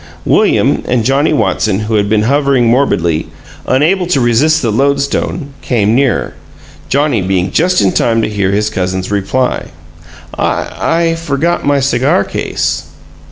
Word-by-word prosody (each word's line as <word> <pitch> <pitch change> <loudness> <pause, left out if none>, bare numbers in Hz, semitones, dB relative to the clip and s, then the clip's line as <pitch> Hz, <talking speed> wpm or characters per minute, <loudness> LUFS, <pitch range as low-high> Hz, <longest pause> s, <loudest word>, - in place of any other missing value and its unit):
William - - +2
and 125 -3 +1
Johnnie 140 +5 +2
Watson, 110 -8 0
who 110 +1 -3
had 100 -1 +1
been 105 0 +2
hovering 140 0 +2
morbidly, 90 - +1 0.4
unable 170 +8 +1
to 170 -6 +1
resist 135 +6 +2
the 115 - 0
lodestone, 140 +3 -1
came 110 -3 0
nearer, 135 0 0 0.6
Johnnie 140 -6 +1
being 95 0 -1
just 180 -4 +2
in 95 -2 +2
time 115 +3 +1
to - - 0
hear 100 -3 -1
his 105 +2 0
cousin's 95 0 -3
reply. 115 +6 -1 0.7
"I - - -1
I 165 0 +1
forgot 165 0 -1
my 145 -1 +3
cigar 140 +6 +1
case." - - -3
125 Hz, 145 wpm, -13 LUFS, 105-145 Hz, 0.7 s, my